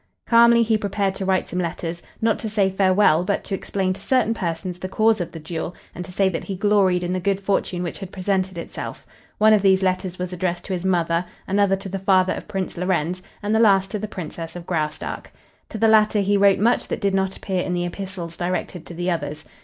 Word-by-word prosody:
Calmly 235 0 +6
he 220 -1 +1
prepared 200 -1 -1
to 195 - -5
write 190 -1 +1
some 180 - -3
letters, 170 0 -3 0.2
not 225 -1 +2
to 220 - -4
say 200 -3 +2
farewell, 185 -3 +4
but 200 +2 -1
to - - -6
explain 190 -1 -1
to - - -11
certain 250 -4 +2
persons 180 -2 -4
the 185 - -5
cause 220 0 +2
of 175 -1 -4
the 165 - -8
duel 165 +2 -5 0.2
and 180 - -6
to 180 - -10
say 195 +1 +2
that 185 - -3
he 195 - -4
gloried 195 -2 +2
in 175 +1 -1
the 185 - 0
good 195 +1 0
fortune 195 -2 -1
which 175 - -5
had 195 -2 -7
presented 190 -1 -1
itself. 170 - -7 0.3
One 215 +1 +6
of 210 - +4
these 190 -1 +4
letters 185 -1 -1
was 180 0 -4
addressed 175 0 -2
to 195 - -3
his 180 -1 -3
mother, 170 -2 +1 0.2
another 200 0 +3
to 195 0 -8
the 195 +1 -4
father 185 -1 +3
of - - -7
Prince 190 -2 -4
Lorenz, 180 0 -1 0.2
and 205 +1 0
the 220 - +3
last 195 -4 +4
to 210 - -2
the 215 - -4
Princess 165 -3 -7
of 175 -1 -7
Graustark. 155 -4 -3 0.4
To - - -6
the 225 - +3
latter 215 -1 +4
he 200 +1 +2
wrote 200 -1 +5
much 235 +4 +2
that - - -3
did 200 -3 0
not 190 0 0
appear 190 -3 -2
in 180 - -2
the 175 0 -1
epistles 175 -2 -6
directed 180 -1 -3
to 175 - -9
the 175 +2 -1
others. 155 -2 -4
190 Hz, 235 wpm, -22 LUFS, 175-200 Hz, 0.4 s, Calmly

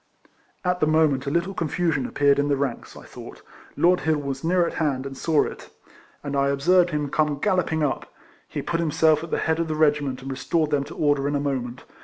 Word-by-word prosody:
At 180 0 +1
the 155 - +2
moment, 155 -4 +2
a - - +2
little 170 +6 -1
confusion 165 -5 -1
appeared 140 0 +2
in 145 - +1
the 140 -1 +1
ranks, 135 -4 -4
I - - -11
thought. - - -12 0.3
Lord 180 +1 +4
Hill 160 -1 +1
was 140 -2 -5
near 175 +1 +2
at - - -4
hand, 135 -4 0
and 135 0 -6
saw 155 +2 +2
it, - - -8 0.5
and 140 -1 -4
I 140 0 +2
observed 175 +6 +3
him 150 -3 -2
come 150 -2 +1
galloping 170 -3 0
up. 140 - -2 0.4
He - - -5
put 170 -1 -2
himself 160 -1 +2
at 165 - -7
the - - -1
head 160 0 0
of 165 - -1
the 155 - -2
regiment, 145 -4 +1
and 135 - -5
restored 150 +4 -1
them 145 -2 +1
to - - -10
order 145 -2 +1
in 145 - -1
a - - +1
moment. 130 -3 -3
150 Hz, 225 wpm, -24 LUFS, 140-165 Hz, 0.5 s, Lord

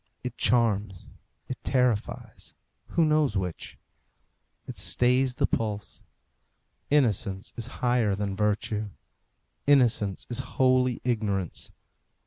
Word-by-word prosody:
It 125 -1 -4
charms, 105 -6 +1 0.4
it 130 - -6
terrifies; 125 -5 -1 0.3
who 165 - +2
knows 150 -8 +2
which? 90 -3 -4 0.9
It - - -6
stays 125 +1 +2
the 140 0 +2
pulse. 105 -3 -3 0.9
Innocence 110 -8 +1
is 115 -1 -4 0.2
higher 120 -5 +2
than 100 -1 -3
virtue. 105 +1 -1 0.8
Innocence 120 -8 +3
is 120 - -1 0.2
holy 130 -1 +3
ignorance. 105 -7 -2
115 Hz, 100 wpm, -27 LUFS, 105-125 Hz, 0.9 s, Innocence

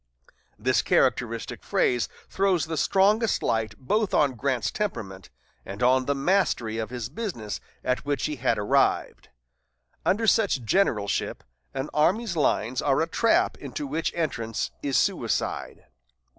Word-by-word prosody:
This - - +2
characteristic - - 0
phrase 120 -2 +1 0.2
throws 190 -5 +1
the 160 0 -4
strongest 205 +7 +2
light 110 -1 0
both 210 +10 0
on 145 -2 +4
Grant's 125 0 -1
temperament, 95 - -4 0.3
and 100 +5 -6
on 130 +1 +4
the 140 - 0
mastery 135 - +1
of 110 - -3
his 120 -2 -4
business 135 - -5 0.2
at 125 0 0
which 145 -1 -1
he 150 -1 -3
had 125 +1 +1
arrived. 105 0 +1 0.7
Under 215 +4 +1
such 200 - +3
generalship, 110 - 0 0.3
an 135 +2 -3
army's 190 +7 +2
lines 130 -4 +1
are 140 -1 +2
a 160 - +1
trap 335 - +2
into 295 - -5
which 165 - -2
entrance 115 -10 -2
is 140 -2 0
suicide. - - -1
140 Hz, 135 wpm, -26 LUFS, 120-195 Hz, 0.7 s, on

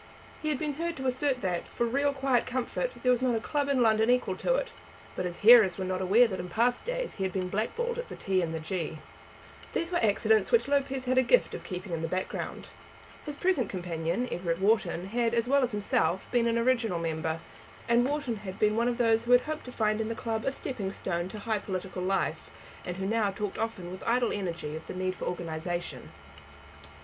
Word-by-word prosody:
He 310 - -1
had 295 - 0
been 300 +1 -2
heard 340 0 -2
to 265 - -5
assert 260 0 0
that, 180 -3 -2
for 235 - -1
real 280 +4 +1
quiet 270 -3 +1
comfort, 255 - -1
there 250 - +4
was 250 -1 +2
not 250 -2 +2
a - - +1
club 285 +5 -1
in 265 -3 +3
London 220 0 +3
equal 250 0 +2
to - - +1
it; - - -2 0.4
but 180 - -2
his 175 -1 -4
hearers 225 -5 +8
were 190 - -2
not 185 0 -2
aware 210 +7 +5
that 190 -4 -4
in 180 0 -5
past 240 +6 +1
days - - -3
he 195 - -2
had 190 - 0
been 185 -1 -2
blackballed 470 - -2
at 485 - -5
the - - -7
T 190 -1 0
and 165 -2 -2
the 160 - -3
G. 160 -1 -3 0.8
These 335 +1 -1
were 345 - +2
accidents 215 +1 +3
which 470 - +4
Lopez 270 -2 0
had 255 +1 +3
a - - +6
gift - - +3
of - - -6
keeping 185 +1 -6
in 165 - -2
the 165 - -1
background. 185 +3 -4 0.6
His 295 - -4
present 290 - +1
companion, 175 +4 -2
Everett 170 -1 -1
Wharton, 190 -3 +1
had, 230 +3 0
as 230 0 +1
well 280 +2 +4
as 250 -1 +1
himself, 200 -3 0
been 240 -1 +3
an 230 0 +1
original 230 -5 +2
member; 160 -1 -2 0.5
and 235 +1 +4
Wharton 275 -4 -1
had 195 -2 -7
been 210 -1 +2
one 235 +1 +2
of 245 -1 0
those 230 -1 +3
who 245 - +4
had 245 - +7
hoped 310 +2 -5
to 250 - -7
find 215 -2 +1
in 220 - -2
the 230 - -3
club 225 -1 -3
a 270 - +2
stepping 230 -8 -4
stone 175 -2 -3
to 215 - -7
high 215 0 -1
political 185 -2 -4
life, 195 +1 -1 0.4
and 180 0 -4
who 190 - -3
now 215 0 +1
talked 200 0 -4
often 220 -6 -3
with 185 - -8
idle 240 0 +2
energy 170 -6 -3
of 160 - -8
the - - -6
need 185 0 -1
of - - -16
organization. 175 0 -4
225 Hz, 230 wpm, -29 LUFS, 185-255 Hz, 0.8 s, hearers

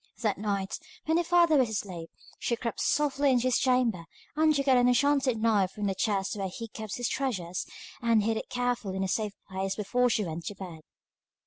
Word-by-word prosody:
That 210 -3 +1
night, 200 -2 -2 0.3
when 320 +1 +2
her 345 - +2
father 340 -2 +4
was 255 -4 +3
asleep, 185 -6 -4 0.3
she 235 - 0
crept 230 -1 -4
softly 285 -1 +2
into 250 -2 +3
his 255 -2 +2
chamber 250 -9 +2 0.3
and 310 +1 +4
took 280 0 0
out 265 - +6
an 245 0 +4
enchanted 270 -1 +3
knife 205 -4 +2
from 210 - -4
the 195 - +1
chest 195 0 -1
where 195 -2 -3
he 230 +5 -7
kept 215 -1 -6
his 245 -2 -1
treasures, 185 -10 -2 0.3
and 230 -3 +3
hid 225 +1 +1
it - - -5
carefully 245 -6 -1
in 190 - 0
a - - 0
safe 210 +2 -1
place 190 0 -3
before 245 +4 +1
she 215 -3 +1
went 165 0 -5
to 205 - -4
bed. 175 -5 -8
225 Hz, 210 wpm, -29 LUFS, 195-255 Hz, 0.3 s, out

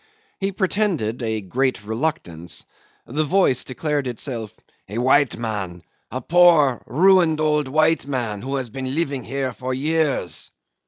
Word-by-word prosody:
He 195 0 -1
pretended 185 - 0
a 110 -2 -1
great 125 +4 -1
reluctance. 110 - -3 0.4
The 150 +6 -1
voice 155 -5 +2
declared 145 +1 -2
itself 115 -3 -4 0.4
"a 105 - -5
white 130 +3 +3
man 100 -7 -4 0.3
a 130 +3 -4
poor, 160 -5 +5
ruined, 170 - +4
old 150 -2 +1 0.4
man 120 -7 -2
who 135 +2 -3
had 130 -4 -3
been 130 +2 -4
living 140 -6 -1
here 135 0 -2
for 130 +3 -4
years." 145 - 0
130 Hz, 130 wpm, -22 LUFS, 115-155 Hz, 0.4 s, poor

